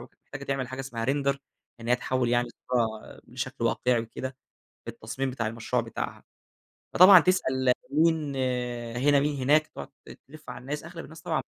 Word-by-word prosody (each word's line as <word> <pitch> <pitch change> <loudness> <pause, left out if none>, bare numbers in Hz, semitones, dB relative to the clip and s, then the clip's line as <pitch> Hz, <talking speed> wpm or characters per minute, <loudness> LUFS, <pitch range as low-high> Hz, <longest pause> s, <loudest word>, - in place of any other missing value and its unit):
ومحتاجة 135 0 -11
تعمل 135 -2 -2
حاجة 130 +1 -5
اسمها 120 -4 -4
Render 140 0 +1 0.4
إن 115 - -7
هي 125 - +4
تحوّل 130 0 -1
يعني 120 0 +2
الصورة 115 -3 -3
بشكل - - -5
واقعي 125 -2 +2
وكده، 130 +3 -6 0.5
في - - -5
التصميم 135 0 -4
بتاع 120 -3 -3
المشروع 115 +1 -1
بتاعها. - - -6 0.7
فطبعًا 185 +1 +10
تسأل 130 -8 +2 0.2
مين 155 -2 +2 0.6
هنا 140 +3 +4
مين 145 +1 0
هناك، 155 +3 +4
تقعد - - -9 0.2
ت - - -11
تلف 155 +1 -12
على - - -8
الناس، 145 +4 -5
أغلب 170 0 -8
الناس 160 0 -12
طبعًا 160 -1 -1
135 Hz, 165 wpm, -27 LUFS, 125-150 Hz, 0.7 s, فطبعًا